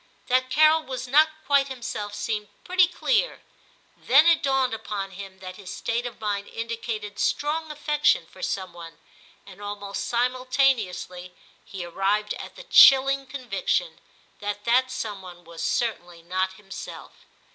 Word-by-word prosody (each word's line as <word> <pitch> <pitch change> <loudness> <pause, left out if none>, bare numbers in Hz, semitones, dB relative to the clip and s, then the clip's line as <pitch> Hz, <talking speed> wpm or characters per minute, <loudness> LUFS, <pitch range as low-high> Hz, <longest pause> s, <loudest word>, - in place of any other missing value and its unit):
That 255 +1 +2
Carol 310 +4 +5
was 260 -3 -6
not 305 +5 +5 0.2
quite 280 0 +3
himself 220 -5 -5
seemed 210 -2 -3 0.2
pretty 365 0 +4
clear; - - 0 0.5
then 275 +5 +5
it 335 -1 +5
dawned 270 -3 +1
upon 205 -3 -4
him 190 0 -9
that 185 -1 -8
his 195 -3 -9
state 235 +1 -2
of 240 - -10
mind 205 -2 -2
indicated 225 -2 -5
strong 315 +2 0
affection 300 0 +1
for - - -16
some 190 -2 -3
one, 165 -1 -11 0.5
and 195 0 -13
almost 205 -1 -5
simultaneously 245 -8 0 0.3
he 185 -3 -7
arrived 200 +4 0
at - - -9
the - - -10
chilling 275 - +6
conviction 255 - -2 0.4
that 205 0 -4
that 255 +3 +3
some 215 -6 -5
one 175 -1 -12
was 165 0 -10
certainly 175 -8 -2
not 185 +2 -1
himself. 195 0 -9
225 Hz, 145 wpm, -25 LUFS, 195-270 Hz, 0.5 s, chilling